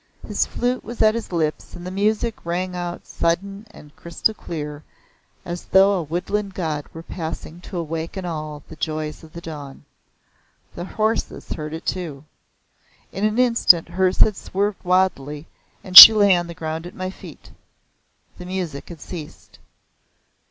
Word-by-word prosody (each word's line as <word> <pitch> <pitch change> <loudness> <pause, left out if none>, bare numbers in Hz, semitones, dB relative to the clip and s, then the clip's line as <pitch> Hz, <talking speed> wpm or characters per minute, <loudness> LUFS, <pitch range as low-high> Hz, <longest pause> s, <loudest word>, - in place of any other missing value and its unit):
His - - 0
flute 245 +1 -2
was 235 -1 -2
at 215 0 +4
his 230 -3 -6
lips 160 -3 -3
and 175 - -10
the 185 - -5
music 215 +3 -1
rang 180 +2 -3
out 175 0 -6
sudden 195 +5 -2
and 150 -8 -16
crystal 170 +6 -2
clear 150 -6 -7 0.6
as 175 0 -6
though 195 +1 +4
a 185 - -1
woodland 185 +5 -3
god 155 -5 -3
were 165 - -10
passing 165 0 -7
to 185 - -8
awaken 165 +3 -5
all 155 -3 -6
the - - -11
joys 155 -1 -4
of 160 - -14
the 170 - -9
dawn. 145 -4 -9 0.9
The 175 - -7
horses 220 +3 -2
heard 155 +1 -5
too. 160 -7 -4 0.9
In 195 +3 -2
an 215 +1 0
instant 230 -9 +4
hers 185 +1 0
had 215 - +4
swerved 200 +1 -3
wildly, 170 -6 0 0.4
and 185 -1 -9
she 220 - +15
lay 205 -3 +4
on 175 -1 -2
the 170 - -9
ground 160 +1 -5
at - - -13
my 185 0 -5
feet. - - -14 0.9
The 180 - -8
music 180 -6 -5
had 165 -4 -11
ceased. 160 -5 -10
175 Hz, 160 wpm, -21 LUFS, 160-195 Hz, 0.9 s, she